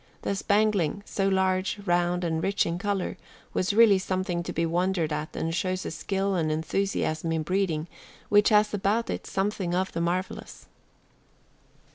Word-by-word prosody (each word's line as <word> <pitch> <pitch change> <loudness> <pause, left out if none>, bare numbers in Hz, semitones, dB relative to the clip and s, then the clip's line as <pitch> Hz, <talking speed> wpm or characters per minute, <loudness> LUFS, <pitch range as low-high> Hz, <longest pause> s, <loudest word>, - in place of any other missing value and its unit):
The 200 - -1
spangling, 205 -3 +1
so 195 -1 -1
large, 190 0 +1
round, 175 0 +1
and 160 -1 -1
rich 195 +3 +1
in 170 +1 -2
color, 200 -1 -2 0.4
was 185 - +1
really 210 -2 +6
something 185 -2 -2
to - - -5
be 165 - 0
wondered 170 -1 0
at 150 +1 -4
and 165 0 -2
shows 185 +1 -1
a - - -3
skill 195 +4 -1
and 160 -4 0
enthusiasm 160 0 -1
in 160 -1 0
breeding 175 -3 0 0.4
which 205 0 +5
has 210 0 +4
about 205 +3 0
it - - -5
something 195 -3 -1
of 185 +1 0
the 170 - -3
marvelous. 180 +2 -3
185 Hz, 160 wpm, -27 LUFS, 170-200 Hz, 0.4 s, really